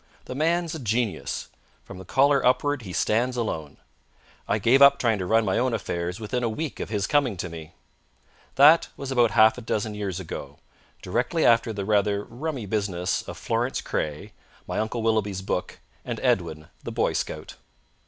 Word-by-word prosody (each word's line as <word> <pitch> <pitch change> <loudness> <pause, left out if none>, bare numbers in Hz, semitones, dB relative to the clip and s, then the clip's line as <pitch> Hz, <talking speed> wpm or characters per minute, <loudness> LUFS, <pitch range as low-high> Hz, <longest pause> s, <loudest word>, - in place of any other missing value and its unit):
The - - -6
man's 165 +4 0
a 160 - -5
genius. 115 -2 -2 0.4
From - - -10
the 95 - -10
collar 140 +6 +3
upward 130 +2 +2
he 95 -5 -8
stands 120 +7 0
alone. 80 -11 -3 0.7
I 105 - +1
gave 120 +6 +4
up 140 0 +8
trying 115 -6 +1
to 90 - -3
run 115 +2 +3
my 95 - +1
own 125 -2 +1
affairs 90 -2 -3
within 115 +3 -2
a 115 - +1
week 150 +6 -4
of - - -4
his 105 -3 -1
coming 135 -9 +1
to 90 - -4
me. 80 -2 -10 0.8
That 150 +4 +7
was 135 -1 -5
about 120 -3 +4
half 110 +3 +5
a - - -9
dozen 110 -1 -2
years 100 -3 -4
ago, 95 - -7 0.5
directly 125 - 0
after 115 -1 +4
the 100 -2 -4
rather 105 -1 +1
rummy 130 0 -5
business 95 -4 -1
of - - -7
Florence - - -1
Craye, 75 -1 -4 0.3
my - - -3
Uncle 110 +1 -2
Willoughby's 105 -4 0
book, 90 - -3 0.3
and - - -4
Edwin, 75 0 0
the - - -6
Boy - - 0
Scout. - - -4
110 Hz, 180 wpm, -25 LUFS, 100-130 Hz, 0.8 s, up